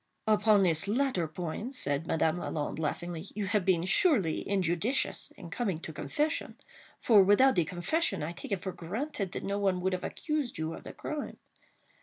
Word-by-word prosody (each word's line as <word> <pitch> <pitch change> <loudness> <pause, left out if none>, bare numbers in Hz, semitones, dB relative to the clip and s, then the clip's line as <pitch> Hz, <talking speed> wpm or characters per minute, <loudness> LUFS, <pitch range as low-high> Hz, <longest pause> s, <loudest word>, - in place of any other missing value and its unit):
"Upon 210 -2 +4
this 170 0 +2
latter 225 -6 +1
point," 175 - -5
said 145 - -1
Madame 160 +1 +1
Lalande, 150 -2 -3
laughingly, 170 +2 -3
"you 210 -1 -1
have 205 0 +1
been 175 -2 +2
surely 195 - +2
injudicious 195 +6 0
in 175 -4 -10
coming 200 -7 -1
to 160 0 -8
confession; 300 - -2 0.4
for, 215 -4 +6
without 205 +8 +6
the 175 -4 +2
confession, 185 - -1
I 155 - -3
take 175 - -9
it 195 -3 0
for 190 - -3
granted 200 - -4
that - - -4
no 200 +1 -1
one 190 -2 +1
would 190 +1 0
have 185 - -2
accused 300 -5 -2
you 160 +1 -2
of - - -10
the - - -6
crime. 305 -1 -5
190 Hz, 180 wpm, -30 LUFS, 170-225 Hz, 0.4 s, for